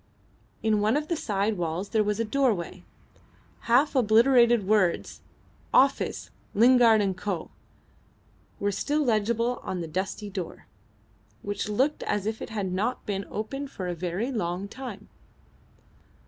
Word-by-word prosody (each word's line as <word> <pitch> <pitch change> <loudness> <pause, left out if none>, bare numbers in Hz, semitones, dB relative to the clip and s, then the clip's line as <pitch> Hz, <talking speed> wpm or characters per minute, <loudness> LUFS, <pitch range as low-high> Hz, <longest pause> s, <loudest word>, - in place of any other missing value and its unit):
In 215 -2 +2
one 215 +6 +2
of 300 +1 -4
the 340 - +1
side 205 -6 -1
walls 170 +3 -2
there 220 -1 +2
was 210 +1 -1
a 230 - +1
doorway. 220 -7 0 0.9
Half 275 +5 +4
obliterated 235 -1 +5
words 200 -5 +1 0.5
"Office: 275 +1 +2 0.2
Lingard 230 -1 +6
and 195 -2 0
Co." 185 -2 -4 1.1
were 205 0 0
still 295 +9 0
legible 235 +1 +1
on 180 -2 -4
the 165 - -4
dusty 190 +5 -4
door, 185 -3 -6 0.8
which 205 0 -3
looked 265 +8 +1
as 205 -1 -1
if 220 +1 -3
it - - -6
had 200 -4 -3
not 220 +7 -2
been 200 -1 -3
opened 270 +6 -4
for 185 -8 -6
a 175 - -2
very 180 +8 -3
long 190 -4 -2
time. 220 -3 -8
215 Hz, 140 wpm, -27 LUFS, 195-240 Hz, 1.1 s, Lingard